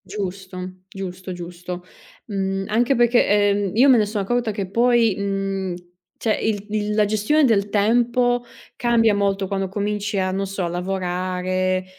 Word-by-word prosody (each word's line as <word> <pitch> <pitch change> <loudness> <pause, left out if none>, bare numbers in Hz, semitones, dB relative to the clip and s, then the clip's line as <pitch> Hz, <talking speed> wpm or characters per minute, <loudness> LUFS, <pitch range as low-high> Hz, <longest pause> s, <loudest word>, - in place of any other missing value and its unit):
Giusto, 190 -1 -6 0.3
giusto, 190 -1 -7
giusto. 175 0 -7 0.4
Mhmm, 195 -2 -2
anche 240 +5 +2
perché, 240 0 +4
ehm, 205 -1 +2
io 255 +5 +6
me 260 -3 +7
ne 215 - +3
so' 210 +1 -4
accorta 235 +4 0
che 200 -2 -4
poi, 235 -1 +3
mhmm, 195 -2 -2 0.4
cioè 220 - +1
il 205 -2 -1
il 210 0 -1
la 210 -1 +4
gestione 215 +9 +2
del 205 -5 +2
tempo 240 +3 +2 0.3
cambia 230 -2 +3
molto 200 -1 0
quando 195 0 -2
cominci 205 +1 -2
a, 185 -1 +1
non 195 +1 -2
so, 190 -2 -3
lavorare, 185 +1 -1
200 Hz, 150 wpm, -22 LUFS, 190-220 Hz, 0.4 s, me